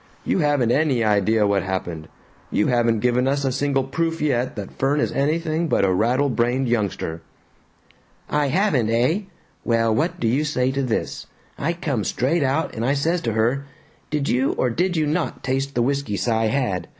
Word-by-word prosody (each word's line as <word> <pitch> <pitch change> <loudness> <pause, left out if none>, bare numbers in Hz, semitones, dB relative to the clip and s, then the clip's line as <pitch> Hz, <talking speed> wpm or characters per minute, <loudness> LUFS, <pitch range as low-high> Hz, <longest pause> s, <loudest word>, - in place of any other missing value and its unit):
You - - +1
haven't 145 -7 +2
any 135 -4 +2
idea 105 +1 +2
what 100 -1 +2
happened. 90 -4 -4 0.4
You - - +1
haven't 120 -3 +2
given 125 +1 +2
us 140 +1 0
a 135 - +1
single 135 0 0
proof 165 +5 -2
yet 130 -5 0
that 100 -3 -7
Fern 140 +2 +2
is - - 0
anything 160 +3 0
but 120 - +2
a 95 - +2
rattle 125 +9 +2
brained 125 +1 0
youngster." 100 -8 -2 1.1
"I 150 -1 +1
haven't, 145 - +1
eh? 125 - +2 0.4
Well, 115 -1 +2
what 170 +8 -1
do 115 - 0
you 130 +7 +2
say 130 -4 0
to 140 +1 -1
this? 125 -4 -3 0.3
I 165 +4 -1
come 145 -10 -2
straight 140 - 0
out 140 +4 0
and 115 - -4
I 135 +4 +2
says 165 +5 0
to 115 -6 -2
her, 120 +6 +1 0.4
'Did 150 -2 -1
you 130 +3 +1
or 125 - 0
did 175 +6 0
you 155 - +2
not 155 +3 -2
taste 135 +1 -2
the 120 - +2
whisky 140 -5 -1
Cy 115 +3 +1
had?' 110 -7 -1
130 Hz, 185 wpm, -22 LUFS, 115-145 Hz, 1.1 s, haven't